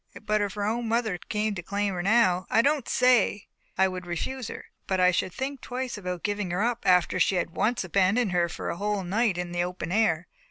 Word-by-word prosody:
But 215 0 +1
if 205 0 -2
her 205 - -2
own 230 +2 -1
mother 220 -5 0
came 210 +2 -2
to 185 - -5
claim 200 +2 -2
her 175 - -2
now, 185 -3 +3
I 230 - +4
don't 285 -2 +1
say 245 -5 +3 0.3
I 190 0 +4
would 185 -1 -6
refuse 240 +8 -3
her, - - -8 0.2
but 190 -1 0
I 180 0 +5
should 185 - -1
think 270 +5 -4
twice 255 0 -4
about 180 -4 -5
giving 205 -2 -2
her 180 +4 0
up 240 -3 -1
after 180 0 +3
she 190 - +3
had 175 -2 -1
once 225 +6 0
abandoned 195 +4 +2
her 175 -1 +1
for - - -4
a - - -5
whole 205 0 -1
night 200 +1 +1
in 180 -1 -4
the 175 0 0
open 180 -1 -5
air. 185 -5 +2
200 Hz, 230 wpm, -27 LUFS, 180-225 Hz, 0.3 s, I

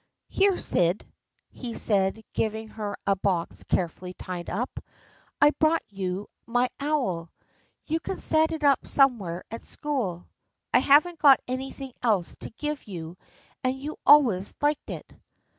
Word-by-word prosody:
" - - -57
Here, 390 -1 +3
Syd," 175 +3 +2 0.5
he 240 -3 -7
said, 200 +1 +1
giving 220 0 -2
her 210 -2 -5
a 200 - +3
box 185 -3 -1
carefully 180 +1 -2
tied 180 -2 -6
up. 245 +4 -4 0.3
" - - -33
I've 295 +1 +4
brought 315 +1 +3
you 195 0 -4 0.2
my 245 +1 +1
owl. 245 - -1 0.5
You 320 +1 -1
can 375 - -5
set 315 0 +4
it 320 -2 -4
up 280 -2 +3
somewhere 215 -11 +2
at 230 - -6
school. 235 - -4 0.5
I - - +7
haven't 310 +4 +4
got 280 -3 +7
anything 265 +1 -5
else 210 -8 +1
to - - -6
give 295 +3 -5
you 170 -3 -7 0.5
and 260 +1 0
you 295 +3 -5
always 235 -11 +5
liked 295 0 0
it." - - -6
235 Hz, 150 wpm, -26 LUFS, 190-290 Hz, 0.5 s, I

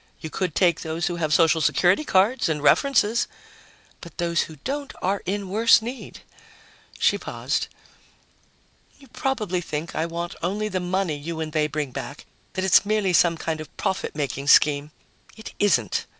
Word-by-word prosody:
"You 160 - -7
could 180 -5 -2
take 175 -3 +2
those 160 +1 -3
who 175 - -2
have 155 -3 -1
social 165 0 +4
security 180 - +3
cards 205 - +2
and 150 -2 -2
references." 235 - +3 0.7
"But 170 - -12
those 170 -1 +1
who 160 - -6
don't 280 +1 -4
have - - -19
any - - 0
are 200 - -2
in 200 +1 -2
worse 225 +4 +5
need!" 240 +3 -8 0.8
She - - +2
paused. - - -2 1.3
"You 275 - -18
probably 215 - -2
think 155 0 -5
I 160 +1 -1
want 170 +1 -5
only 205 +5 -2
the 185 -2 -2
money 180 -2 -1
you 160 +3 -6
and 155 -1 -4
they 155 -1 +2
bring 150 -3 -3
back, 140 +2 -7 0.3
that 185 - -2
it's 190 - +6
merely 205 -3 0
some 170 0 +4
sort 160 -1 -3
of 155 - -12
profit 190 - -2
making 140 -1 -3
scheme. 145 0 +5 0.5
It 220 - -10
isn't." 125 - +1
175 Hz, 175 wpm, -24 LUFS, 155-205 Hz, 1.3 s, it's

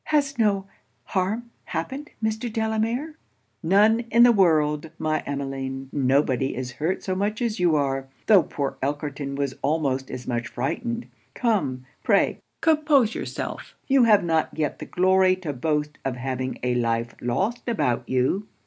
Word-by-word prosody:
'Has 285 -4 +1
no 200 -3 +2 0.4
harm 210 +5 -2
happened, 265 - -4
Mr. 220 +2 -1
Delamere?' 225 +7 -1 0.4
'None 205 +6 +4
in 235 +1 +6
the 245 - +8
world, 155 -6 +3
my 155 -1 0
Emmeline. 135 -1 -4
Nobody 135 -1 +1
is 125 0 -4
hurt 155 +9 -2
so 185 - -1
much 205 +3 -1
as 230 -4 -1
you 175 -3 +3
are; 135 -2 0 0.2
tho' 205 -4 +7
poor 140 -3 -4
Elkerton 140 0 -3
was 140 -1 -1
almost 135 -3 0
as 125 - -6
much 120 -1 -2
frightened. 235 - -3 0.3
Come, 145 - 0 0.2
pray - - +2 0.2
compose 300 -7 +3
yourself - - -5
you 270 -3 +5
have 210 -4 +5
not 160 -2 +1
yet 150 -3 -1
the - - -6
glory 185 0 +4
to 175 -6 -5
boast 150 +2 -1
of 135 -2 -2
having 130 0 -3
a 125 0 +1
life 115 -1 0
lost 195 - -1
about 125 - 0
you.' 130 +11 +1
160 Hz, 150 wpm, -24 LUFS, 135-220 Hz, 0.4 s, the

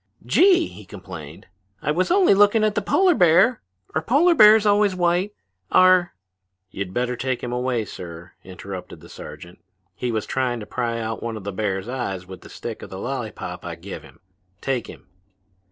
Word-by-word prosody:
"Gee!" 360 -2 +5
he 105 - -11
complained, 90 -6 -10 0.3
"I - - -1
was 180 +4 0
only 370 - +5
looking 205 +2 +4
at 215 -1 +2
the 210 - 0
polar 370 - +3
bear. 185 - +4 0.3
Are 155 - 0
polar 290 - +4
bears 215 -6 +7
always 205 -1 +3
white? 180 +3 0 0.4
Are 185 -1 +5 0.3
" 95 0 -54
"You'd 95 -2 -5
better 125 +4 -1
take 130 0 -3
him 120 - -3
away, 125 -2 -1
sir," 85 -2 -9
interrupted 95 0 -9
the - - -14
sergeant. - - -11 0.3
"He 125 - -3
was 110 -2 -2
trying 125 -2 -1
to 105 - -7
pry 115 0 -3
out 110 0 -4
one 115 -1 -4
of 105 - -9
the 100 0 -5
bear's 95 0 -2
eyes 120 -8 -4
with 95 0 -11
the - - -13
stick - - -7
of - - -9
the - - -8
lollypop - - -5
I - - -6
give - - -8
him. - - -17 0.4
Take 130 -2 -2
him." - - -12
125 Hz, 185 wpm, -22 LUFS, -, 0.4 s, bears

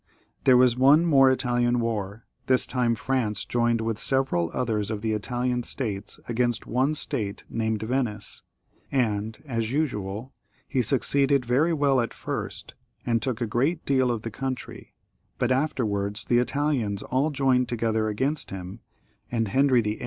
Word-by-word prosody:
There 130 -2 +7
was 125 -1 +5
one 140 +6 +5
more 135 -5 +6
Italian 120 -2 +1
war; 110 -2 -3 0.2
this 130 -1 +4
time 125 -2 0
France 115 -3 -1
joined 120 -1 +1
with 110 -1 -2
several 130 -13 +1
others 110 -5 -1
of 110 -2 -3
the 110 0 -1
Italian 125 +3 -1
states 105 -5 -3
against 120 0 0
one 130 +6 +1
state 110 -9 -3
named 110 -1 -1
Venice, 115 -3 -2 0.5
and, 110 -4 -1
as 115 -4 -2
usual, 125 -4 -2 0.3
he 130 - +1
succeeded 135 +2 +2
very 135 +8 +2
well 140 -5 +3
at 115 - -4
first, - - -5 0.3
and 115 -2 +1
took 130 -3 -3
a - - +2
great 135 +10 0
deal 130 -2 +2
of 115 -3 -2
the 115 - -4
country, 130 +2 -6 0.4
but 125 - 0
afterwards 110 -7 0
the 120 - +3
Italians 125 -6 0
all 135 +4 0
joined 135 -3 +2
together 110 -2 0
against 135 +8 -1
him, 95 +3 -7 0.5
and 115 -3 0
Henry 130 +1 +4
VIII. 105 0 -3
120 Hz, 150 wpm, -26 LUFS, 110-135 Hz, 0.5 s, There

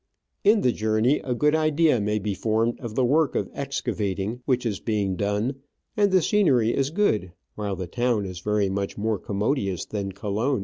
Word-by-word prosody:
In 210 +1 +5
the 125 - +3
journey 110 +6 +1
a 125 -2 -3
good 150 +4 +2
idea 155 -4 +3
may 105 +1 0
be 105 0 -2
formed 115 +4 0
of 115 -3 -7
the 130 - +2
work 150 +4 +2
of - - -1
excavating 110 -5 -3
which 125 -2 +1
is 105 -4 -1
being 100 -4 -1
done; 105 +7 -1 0.4
and 205 -2 +3
the 185 -3 +4
scenery 135 - +3
is 135 0 +1
good, 110 - 0 0.2
while 100 -2 -3
the 95 0 -4
town 120 +2 0
is 90 -2 -6
very 105 +1 +1
much 100 +1 -3
more 110 -1 -1
commodious 100 - -1
than 100 -2 -4
Colon. 105 +7 -1
110 Hz, 185 wpm, -25 LUFS, 100-135 Hz, 0.4 s, In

